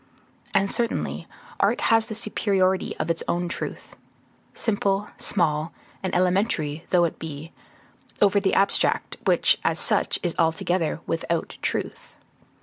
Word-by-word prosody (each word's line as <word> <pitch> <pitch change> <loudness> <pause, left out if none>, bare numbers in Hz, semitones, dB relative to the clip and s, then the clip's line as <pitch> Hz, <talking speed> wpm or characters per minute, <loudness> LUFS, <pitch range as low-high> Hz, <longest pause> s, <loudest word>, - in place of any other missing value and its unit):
And 195 0 +2
certainly 235 -1 -1 0.3
art - - +3
has 225 -1 +4
the 220 - -5
superiority 195 -3 0
of - - 0
its 165 - -2
own 175 +1 0
truth; 170 - -6 0.6
simple, 205 -2 0
small, 155 -4 0 0.3
and 190 - -2
elementary 180 -5 +1
though 180 -2 +4
it 170 - -1
be, 160 0 -7 0.7
over 200 0 +5
the 195 -1 +1
abstract, 200 +1 +2
which, - - +4
as - - +1
such, - - +1
is 175 -2 0
altogether 165 0 +1
without 165 0 -2
truth. - - -4
180 Hz, 130 wpm, -25 LUFS, 165-200 Hz, 0.7 s, over